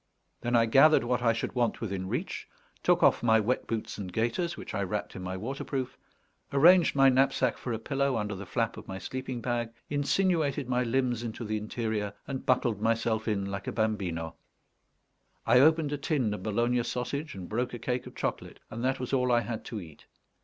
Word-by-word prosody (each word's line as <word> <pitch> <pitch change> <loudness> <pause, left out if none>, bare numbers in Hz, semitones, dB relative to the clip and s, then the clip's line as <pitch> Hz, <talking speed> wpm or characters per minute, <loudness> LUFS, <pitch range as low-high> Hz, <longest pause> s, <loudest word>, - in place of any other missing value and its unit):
Then 120 +1 0
I 115 -1 +5
gathered 135 +5 +6
what 125 +1 0
I 115 -1 +4
should 115 -1 -3
want 120 -2 0
within 95 -4 -3
reach, - - -3 0.3
took - - +3
off - - +5
my 110 -2 +4
wet 115 +4 -1
boots 110 -2 -4
and 95 -3 -5
gaiters, 120 - -1
which - - -8
I 100 - -1
wrapped 100 +2 -3
in - - -6
my 95 +1 -4
waterproof, 130 +3 -4 0.6
arranged 165 +4 +6
my 135 -1 +6
knapsack 130 -1 +3
for 125 - -5
a 115 - -1
pillow 135 +2 0
under 105 -1 -2
the 100 0 -7
flap - - -1
of - - -10
my 95 - -5
sleeping 130 +3 -5
bag, 120 -2 -1 0.2
insinuated 145 -2 +1
my 125 0 +1
limbs 125 -1 0
into 115 0 -5
the 110 0 -1
interior, 105 -1 -3
and 135 -1 -5
buckled 120 -5 +2
myself 115 0 0
in 100 -3 0
like 100 0 -5
a - - -1
bambino. 95 -7 -1 1.1
I 125 +2 +6
opened 155 +1 +4
a 145 - -3
tin 135 -7 0
of 105 - -5
Bologna 120 +4 +1
sausage, 140 +5 -3
and 90 -2 -7
broke 120 +3 -1
a - - -5
cake 125 +2 -3
of - - -12
chocolate, - - -4
and 115 +2 -5
that 130 +1 +1
was 125 +1 -4
all 125 -1 +2
I 120 -1 +4
had 115 -2 -5
to 110 - -5
eat. 80 -6 -13
120 Hz, 205 wpm, -29 LUFS, 110-130 Hz, 1.1 s, gathered